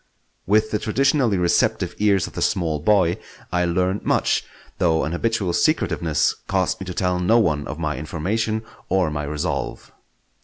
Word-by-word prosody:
With 110 Hz, +2 st, +3 dB
the 105 Hz, -, 0 dB
traditionally 125 Hz, 0 st, +2 dB
receptive 90 Hz, +1 st, +1 dB
ears 100 Hz, -3 st, +3 dB
of -, -, -10 dB
the -, -, -5 dB
small 80 Hz, -4 st, 0 dB
boy, 90 Hz, 0 st, +2 dB, 0.3 s
I 90 Hz, 0 st, +1 dB
learned 90 Hz, +3 st, 0 dB
much; -, -, +1 dB, 0.4 s
though 80 Hz, -2 st, +2 dB
an 80 Hz, -, -2 dB
habitual 100 Hz, -1 st, -1 dB
secretiveness 85 Hz, -, +1 dB
caused 95 Hz, -1 st, 0 dB
me 95 Hz, -, -6 dB
to 90 Hz, -, -4 dB
tell 90 Hz, -1 st, 0 dB
no 90 Hz, +6 st, +3 dB
one 75 Hz, -10 st, +1 dB
of 75 Hz, -, -5 dB
my 75 Hz, -2 st, -2 dB
information 110 Hz, +9 st, -2 dB, 0.3 s
or 95 Hz, -5 st, +2 dB
my 75 Hz, -1 st, -3 dB
resolve. 75 Hz, +1 st, -3 dB
90 Hz, 160 wpm, -22 LUFS, 80-105 Hz, 0.4 s, With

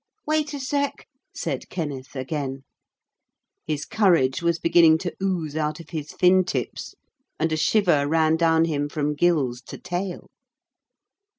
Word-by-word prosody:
'Wait 305 Hz, -1 st, 0 dB
a -, -, -5 dB
sec.,' 280 Hz, +2 st, -2 dB, 0.3 s
said -, -, -4 dB
Kenneth 145 Hz, -6 st, -5 dB
again. 135 Hz, 0 st, -4 dB, 1.0 s
His 150 Hz, -1 st, -2 dB
courage 170 Hz, -10 st, +2 dB
was 170 Hz, -1 st, +1 dB
beginning 165 Hz, -1 st, +5 dB
to 175 Hz, +1 st, -5 dB
ooze 175 Hz, -6 st, -1 dB
out 155 Hz, 0 st, -1 dB
of 165 Hz, 0 st, -12 dB
his 155 Hz, -2 st, -5 dB
fin 185 Hz, +1 st, +4 dB
tips, 130 Hz, -9 st, -4 dB, 0.4 s
and 165 Hz, -, 0 dB
a -, -, +1 dB
shiver 155 Hz, -4 st, +2 dB
ran 160 Hz, +1 st, +3 dB
down 165 Hz, 0 st, +3 dB
him 145 Hz, -3 st, -1 dB
from 150 Hz, 0 st, -1 dB
gills 145 Hz, -6 st, +1 dB
to -, -, -8 dB
tail. 180 Hz, 0 st, -4 dB
160 Hz, 140 wpm, -24 LUFS, 145-180 Hz, 1.0 s, beginning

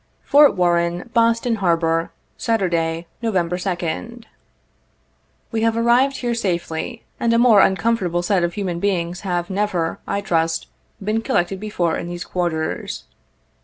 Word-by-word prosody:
" -, -, -42 dB
Fort 290 Hz, 0 st, +7 dB
Warren, 175 Hz, +3 st, +1 dB
Boston 230 Hz, 0 st, +2 dB
Harbor, 165 Hz, -3 st, +1 dB, 0.2 s
Saturday, 170 Hz, -6 st, 0 dB, 0.2 s
Nov. 225 Hz, -3 st, -1 dB
2d. 180 Hz, +5 st, -2 dB, 0.7 s
" -, -, -42 dB
We 225 Hz, -1 st, -1 dB
have 225 Hz, 0 st, +2 dB
arrived 245 Hz, +4 st, +3 dB
here 240 Hz, -1 st, -1 dB
safely, 190 Hz, +1 st, -3 dB, 0.2 s
and 235 Hz, -, +1 dB
a -, -, +4 dB
more 230 Hz, -4 st, +6 dB
uncomfortable 190 Hz, -4 st, +1 dB
set 185 Hz, 0 st, +2 dB
of 175 Hz, 0 st, -1 dB
human 185 Hz, -4 st, -2 dB
beings 180 Hz, -2 st, -1 dB
have 175 Hz, -2 st, -2 dB
never, 185 Hz, -4 st, -1 dB
I 200 Hz, 0 st, -1 dB
trust, 165 Hz, -3 st, 0 dB, 0.4 s
been 215 Hz, +3 st, 0 dB
collected 190 Hz, -2 st, 0 dB
before 180 Hz, -6 st, -1 dB
in -, -, -5 dB
these 175 Hz, 0 st, -5 dB
quarters. 170 Hz, -4 st, -3 dB
185 Hz, 140 wpm, -21 LUFS, 170-225 Hz, 0.7 s, Fort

